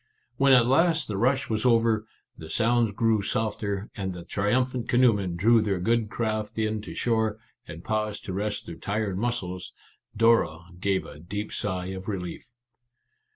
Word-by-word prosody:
When 135 0 +4
at 125 -2 +6
last 165 +5 +3
the 105 - -3
rush 130 +6 +1
was 110 -1 -1
over, 115 -3 +3 0.3
the 80 - -10
sounds 115 +3 +2
grew 110 +1 +2
softer, 105 -1 -2
and 95 -2 -3
the 90 -1 -8
trium 105 +8 +1
phant 125 -2 -6
canoemen 105 -8 +3
drew 110 +6 +4
their 100 -3 0
good 115 +3 +1
craft 110 -1 -2
in 110 -1 0
to - - -9
shore, 110 -3 0 0.3
and 80 +1 -9
paused 105 -1 -2
to 95 - -4
rest 105 +2 -2
their 85 - -7
tired 100 -1 -2
muscles, 95 -6 -3 0.4
Dora 115 -8 +4 0.2
gave 95 0 0
a 75 - -11
deep 100 +6 -5
sigh 95 -2 -3
of 95 0 -8
relief. 95 +1 -5
110 Hz, 165 wpm, -26 LUFS, 100-115 Hz, 0.4 s, at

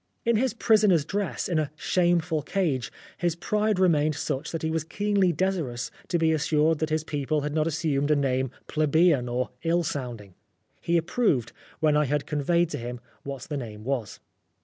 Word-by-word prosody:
In 235 0 +3
his 245 +2 +1
prisoner's 210 -10 +4
dress, 200 +2 -2
in 170 -4 +1
a 150 -2 -1
shameful 170 -2 +1
cage, 145 - -1 0.3
his 175 -2 0
pride 210 +4 0
remained 155 -5 +3
such 145 0 -3
that 165 -2 -4
he 160 - 0
was 160 -1 -1
keenly 200 +1 +1
^ - - -12
desirous 160 -11 -1 0.2
to 175 - +1
be 160 -1 +3
assured 155 0 +2
that 155 - -1
his 155 0 0
people 150 0 -1
had 145 +1 -3
not 155 0 +1
assumed 150 -3 0
a 150 - +5
name 130 -2 +1 0.2
plebeian 155 -4 +2
or 125 +1 -1
ill 170 +1 +1
sounding. 120 - -5 0.5
He 170 0 +2
approved, 165 - +1 0.3
when 155 -1 +4
I 150 0 +3
had 145 +1 -1
conveyed 170 +3 +1
to 145 - -3
him 120 +1 -5 0.2
what 135 -3 -6
the 150 - -4
name 110 -5 -7
was. 125 -4 -3
155 Hz, 185 wpm, -26 LUFS, 140-175 Hz, 0.5 s, a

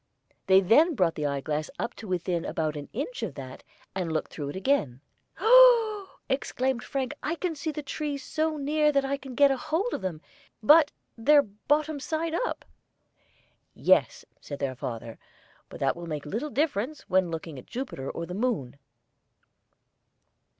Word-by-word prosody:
They 190 0 +7
then 300 - +4
brought 180 -7 +2
the 150 -1 -2
eyeglass 150 +2 -2
up - - -3
to 220 - -9
within 175 -2 -1
about 155 -1 -2
an 145 -1 -7
inch 250 0 -4
of 190 -11 -4
that, 130 -2 -8 0.3
and 180 -3 -2
looked 155 -1 -2
through 145 -3 -5
it - - -6
again. 190 - 0 0.4
"Oh - - -5
oh 455 -4 +6
oo!" - - -26
exclaimed 265 -2 -1
Frank: 270 0 -3
"I 325 +3 -2 0.2
see 310 +1 -4
the 300 -1 -4
trees 285 -1 -4
so 315 0 -1
near 300 +1 +2
that 275 -1 +2
I 275 +1 0
can 265 -2 -10
get 280 +1 +6
hold 320 - -1
of - - -3
them, 185 -5 -3 0.4
but 300 +5 +7 0.3
they're 290 +5 +6
bottom 290 +9 -1
side 320 +3 -2
up!" - - -2 1.1
"Yes," - - +2
said 145 - -7
their 135 -2 -2
father, 115 -2 -6 0.5
"but - - -10
that 135 -1 +1
will 170 0 -8
make 150 -2 -4
little 225 - -3
difference 285 -1 -1
when 185 -1 +1
looking 160 -3 -6
at - - -15
Jupiter 240 - -5
or 170 - -4
the 180 - -7
moon." 195 - -2
245 Hz, 170 wpm, -27 LUFS, -, 1.1 s, They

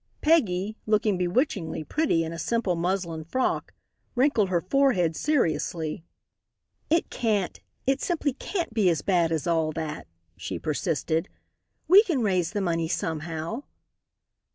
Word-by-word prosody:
Peggy, 215 - +2
looking 215 -1 +2
bewitchingly 180 - 0
pretty 285 - +1
in 165 0 -4
a 165 - -6
simple 230 -5 0
muslin 170 -2 -2
frock, 255 +11 -1 0.4
wrinkled 245 -6 +3
her 175 -2 +2
forehead 185 - +2
seriously. 170 - 0 0.9
"It 330 +2 +2
can't 210 -6 0 0.3
it 270 +1 +1
simply 310 -6 0
can't 340 - -4
be 210 -5 +3
as 165 -4 0
bad 175 -4 +2
as 160 -3 -1
all 165 -2 +1
that," 155 -1 -5 0.3
she - - -5
persisted. 165 +3 -1 0.6
"We 380 +5 +9
can 330 - 0
raise 185 -5 +1
the 205 -1 -2
money 165 -3 0
somehow." 160 - -3
185 Hz, 130 wpm, -26 LUFS, 165-250 Hz, 0.9 s, We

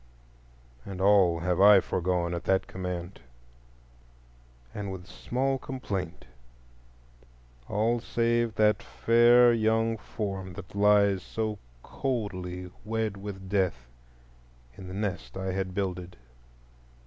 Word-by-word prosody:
_ - - -6
And 95 - -6
all 95 -4 +4
have 90 +1 0
I 100 0 +9
foregone 90 -1 -1
at 85 - -5
that 95 0 +2
command, 90 0 -6 1.5
and 100 -2 -5
with 90 -2 -8
small 130 +7 -2
complaint,—all - - -6
save 115 -1 0
that 105 0 +3
fair 120 +1 +5
young 115 0 +1
form 95 -4 -5
that 95 0 -10
lies 100 -1 +4
so 110 -2 -3 0.2
coldly 90 -8 -4
wed 110 -1 -2
with 95 -1 -8
death 90 -12 -1 0.8
in 95 - -10
the 95 - -7
nest 100 -3 -4
I 95 0 -2
had 95 -1 -3
builded. 90 -2 -3
95 Hz, 110 wpm, -28 LUFS, 90-110 Hz, 1.5 s, I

